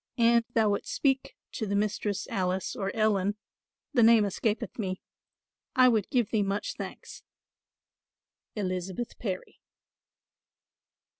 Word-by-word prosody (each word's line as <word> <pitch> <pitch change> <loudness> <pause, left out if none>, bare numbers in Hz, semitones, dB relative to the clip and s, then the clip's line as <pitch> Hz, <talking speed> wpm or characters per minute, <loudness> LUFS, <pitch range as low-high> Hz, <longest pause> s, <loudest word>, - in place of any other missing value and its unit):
"An 235 0 +5
thou 220 -2 +4
wouldst 200 - -2
speak 270 -2 +1 0.2
to 220 - -3
the 200 - -1
Mistress 205 -1 -1
Alice 185 +3 -1
or 195 -5 -2
Ellen, 205 -2 +2 0.6
the 245 - +4
name 225 -2 +7
escapeth 215 +4 -2
me, 185 -3 -2 0.8
I 255 -1 +7
would 220 -5 +1
give 245 -6 +1
thee 220 - +2
much 200 +1 -1
thanks. - - -8 1.3
"ELIZABETH 185 +2 -3
PARRY." 190 -5 -5
210 Hz, 120 wpm, -29 LUFS, 195-230 Hz, 1.3 s, name